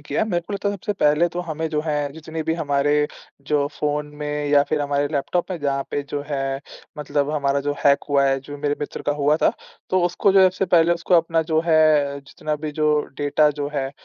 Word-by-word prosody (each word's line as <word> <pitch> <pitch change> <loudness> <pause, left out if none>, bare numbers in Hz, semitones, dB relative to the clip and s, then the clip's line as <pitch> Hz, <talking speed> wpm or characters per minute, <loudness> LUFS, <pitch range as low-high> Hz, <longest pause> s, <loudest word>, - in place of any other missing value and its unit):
किया, 145 +8 -1
मेरे 175 -5 -1
को 175 +4 -9
लगता 200 0 -1
है 200 - -1
सबसे 205 +2 -3
पहले 155 -2 +3
तो 175 +1 -4
हमें 160 -1 -3
जो 150 -1 -1
है, 150 - 0 0.2
जितने 160 0 -6
भी 160 - -1
हमारे 145 -1 +1 0.4
जो 145 -1 +2
फ़ोन 150 0 -1 0.2
में 150 0 -2
या 145 -1 +5
फिर - - 0
हमारे 145 0 0
लैपटॉप 170 +6 -1
में 180 - -3
जहाँ 140 -1 0
पे 145 - -1
जो 145 - -3
है, 135 -2 -2 0.4
मतलब 145 0 -1
हमारा 140 -2 0
जो - - +2
हैक 140 0 +4
हुआ 140 -1 +3
है, 135 0 +2
जो 145 +2 -9
मेरे 145 0 0
मित्र 145 - -5
का 145 - +2
हुआ 150 +2 +3
था, - - +4 0.4
तो 185 - +3
उसको 180 +3 +2
जो 195 - +5
है - - +8
सबसे 185 +1 -2
पहले 170 +1 +5
उसको 170 +1 0
अपना 165 -1 +3
जो 160 - +4
है, 155 -3 +3
जितना 150 +2 -5
भी 155 - -2
जो 150 0 +3 0.3
डेटा 145 +1 +3
जो 145 - -1
है, 135 -1 -1
150 Hz, 230 wpm, -22 LUFS, 145-165 Hz, 0.4 s, है